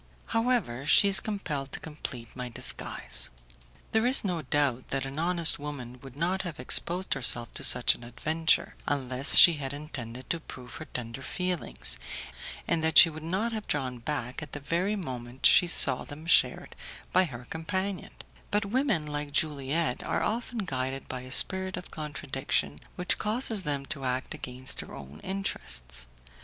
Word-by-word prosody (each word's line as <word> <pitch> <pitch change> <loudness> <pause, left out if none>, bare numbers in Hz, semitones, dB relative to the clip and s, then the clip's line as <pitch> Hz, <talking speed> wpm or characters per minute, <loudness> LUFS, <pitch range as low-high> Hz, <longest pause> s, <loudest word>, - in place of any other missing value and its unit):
However, 225 - 0
she 200 - +6
is 195 - +6
compelled 150 -10 -4
to - - -3
complete 135 -7 -7
my 125 -1 -5
disguise. 115 - +1 0.6
There 220 +2 +2
is 260 - +5
no 180 -5 -2
doubt 135 -3 0
that 135 -1 -2
an 135 +3 -6
honest 170 -1 +3
woman 130 -4 -7
would 135 -2 -12
not 180 +5 -1
have 170 -7 -7
exposed 175 +8 +3
herself 120 -3 0
to - - -1
such 125 -1 +5
an - - -12
adventure, 160 +7 +1
unless 135 -1 +2
she 170 - +10
had 135 0 -3
intended 130 -5 -7
to 170 - -1
prove 125 -5 -10
her - - -8
tender 120 +1 -6
feelings, 165 - -1 0.7
and 165 -1 0
that 160 0 +2
she 165 - +11
would 155 0 -9
not 190 +8 -1
have 220 -2 -5
drawn 130 -4 -2
back 125 0 -4
at 150 - -9
the 145 - -3
very 175 +8 -1
moment 130 - -6
she 175 - +7
saw 130 -6 +4
them 150 +2 -11
shared 175 - +2 0.4
by 185 +1 +5
her 125 -6 -9
companion; 190 +4 -3 0.4
but 205 0 0
women 215 - 0
like 145 -1 -4
Juliette 150 -1 0
are - - -1
often 230 -1 -3
guided 130 -3 -4
by 130 -1 -5
a 130 0 -11
spirit 190 +6 +2
of 180 - -9
contradiction 135 - -3 0.2
which 180 +1 -1
causes 220 -1 0
them 145 -4 -3
to 140 0 -5
act 130 0 -2
against 130 +1 -2
their - - -8
own 70 +2 -11
interests. - - -3
145 Hz, 170 wpm, -28 LUFS, 130-180 Hz, 0.7 s, she